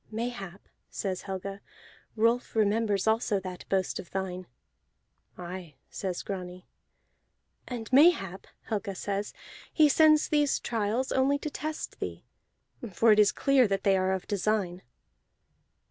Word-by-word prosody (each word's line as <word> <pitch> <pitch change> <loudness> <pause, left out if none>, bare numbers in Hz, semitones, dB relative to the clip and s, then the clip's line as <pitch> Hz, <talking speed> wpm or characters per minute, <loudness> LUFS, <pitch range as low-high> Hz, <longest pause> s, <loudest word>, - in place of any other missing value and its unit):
"Mayhap," 220 -5 -5 0.2
says 190 -2 -3
Helga, 195 0 -6 0.5
"Rolf 230 +2 +1
remembers 210 -2 +2
also 220 -2 +2
that 185 -1 -8
boast 190 -1 0
of 175 - -9
thine." 185 -1 -4 0.9
"Aye," 175 -3 -8 0.2
says 185 -3 -4
Grani. 180 -2 -6 1.0
"And 235 -3 -5
mayhap," 260 - +4 0.2
Helga 205 -3 -3
says, 200 +2 -3 0.4
"he 310 -2 +5
sends 310 +1 +5
these 295 -2 +2
trials 230 +3 -1
only 270 +2 +2
to 305 +1 -5
test 310 +3 -5
thee, - - -6 0.7
for 225 +5 +4
it 210 - +5
is 210 -1 +6
clear 275 -3 +3
that 195 -1 -1
they 195 -1 +4
are 185 0 +1
of 190 -1 -3
design." 200 -3 -1
205 Hz, 130 wpm, -28 LUFS, 190-240 Hz, 1.0 s, is